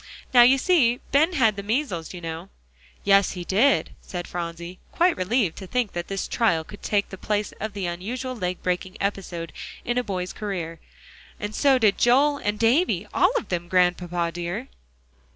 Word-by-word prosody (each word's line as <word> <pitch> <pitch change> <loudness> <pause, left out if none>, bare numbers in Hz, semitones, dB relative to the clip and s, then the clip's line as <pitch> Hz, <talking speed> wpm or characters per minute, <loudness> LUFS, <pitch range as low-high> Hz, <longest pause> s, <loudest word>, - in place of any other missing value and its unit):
Now 245 - +8
you 255 +3 +7
see, 260 -7 +3
Ben 315 +6 +4
had 225 -9 +3
the 200 - -4
measles, 205 - -2
you 180 - -8
know." 165 +3 -6 0.5
"Yes, 200 0 +4
he 180 -2 -6
did," 225 +10 +2
said 175 -2 -6
Phronsie, 170 +1 -6
quite 350 0 +3
relieved 195 -1 0
to 190 - -8
think 245 -1 -1
that 175 0 -4
this 195 -1 -3
trial 170 -9 +1
could 205 +5 -13
take 205 -1 0
the 190 - -9
place 210 0 -1
of 215 0 -4
the 200 -1 -5
usual 230 +10 -4
leg 180 -5 -3
breaking 180 +1 -2
episode 185 -4 -3 0.3
in 240 +1 +1
a - - -1
boy's 185 -4 -4
career. 175 -6 -5 0.6
"And 210 0 -4
so 275 +3 +4
did 215 -5 +3
Joel, 280 +4 +4
and 205 0 -1
Davie 245 +12 +2
all - - +4
of - - -4
them, 175 -1 -2
Grandpapa 175 -1 +1
dear." 175 +9 -4
200 Hz, 180 wpm, -24 LUFS, 180-245 Hz, 0.6 s, Now